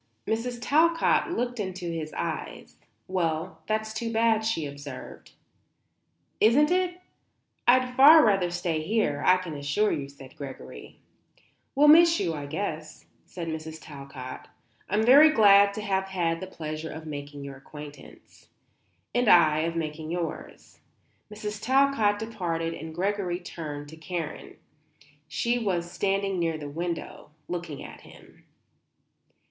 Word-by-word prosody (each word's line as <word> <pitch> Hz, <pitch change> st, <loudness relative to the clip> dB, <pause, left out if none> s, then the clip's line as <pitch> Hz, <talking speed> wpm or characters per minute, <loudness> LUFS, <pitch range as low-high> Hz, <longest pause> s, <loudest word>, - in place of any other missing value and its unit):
Mrs. 240 Hz, +2 st, -2 dB
Talcott 330 Hz, +9 st, +2 dB
looked 245 Hz, -7 st, -2 dB
into 185 Hz, -2 st, -4 dB
his 160 Hz, -2 st, -5 dB
eyes. -, -, -5 dB, 0.3 s
"Well, 170 Hz, -1 st, -2 dB
that's 220 Hz, 0 st, -2 dB
too 230 Hz, +1 st, -3 dB
bad," 225 Hz, -1 st, +2 dB
she 220 Hz, -9 st, -1 dB
observed. 140 Hz, -2 st, -9 dB, 1.1 s
"Isn't 285 Hz, +9 st, +4 dB
it? 360 Hz, 0 st, 0 dB, 0.7 s
I'd 250 Hz, 0 st, +4 dB
far 300 Hz, +2 st, +9 dB
rather 195 Hz, -4 st, +2 dB
stay 175 Hz, -2 st, -2 dB
here, 160 Hz, -5 st, 0 dB
I 185 Hz, -, +5 dB
can 180 Hz, -3 st, -6 dB
assure 145 Hz, +9 st, 0 dB
you," 140 Hz, -1 st, -3 dB
said 135 Hz, -2 st, -14 dB
Gregory. 65 Hz, -, -10 dB, 0.8 s
"We'll 290 Hz, +2 st, +5 dB
miss 335 Hz, +2 st, +7 dB
you, 165 Hz, -, -1 dB
I 145 Hz, -2 st, -6 dB
guess," 155 Hz, -1 st, -5 dB, 0.2 s
said 175 Hz, -2 st, -7 dB
Mrs. 160 Hz, 0 st, -5 dB
Talcott. 140 Hz, -4 st, -9 dB, 0.4 s
"I'm 215 Hz, +2 st, +1 dB
very 285 Hz, +6 st, +8 dB
glad 200 Hz, -6 st, +6 dB
to 215 Hz, -, -4 dB
have 190 Hz, -2 st, 0 dB
had 170 Hz, -3 st, -1 dB
the 190 Hz, -, -6 dB
pleasure 155 Hz, -3 st, -6 dB
of 160 Hz, +1 st, -8 dB
making 145 Hz, -1 st, -7 dB
your 140 Hz, -1 st, -8 dB
acquaintance." 150 Hz, +1 st, -13 dB, 0.7 s
"And 245 Hz, -1 st, +1 dB
I 155 Hz, -5 st, +6 dB
of 165 Hz, +1 st, -1 dB
making 155 Hz, -1 st, -4 dB
yours." 170 Hz, -1 st, -6 dB, 0.5 s
Mrs. 210 Hz, 0 st, -6 dB
Talcott 260 Hz, -5 st, +3 dB
departed 175 Hz, -7 st, -3 dB
and 160 Hz, 0 st, -8 dB
Gregory 185 Hz, -1 st, -1 dB
turned 150 Hz, -5 st, -7 dB
to 160 Hz, -, -12 dB
Karen. 160 Hz, -1 st, -6 dB, 0.7 s
She 235 Hz, +9 st, 0 dB
was 175 Hz, -6 st, -2 dB
standing 195 Hz, -1 st, -1 dB
near 165 Hz, -2 st, 0 dB
the 145 Hz, -2 st, -7 dB
window, 170 Hz, 0 st, -5 dB, 0.2 s
looking 175 Hz, -5 st, -5 dB
at -, -, -11 dB
him. -, -, -18 dB
175 Hz, 135 wpm, -27 LUFS, 155-220 Hz, 1.1 s, far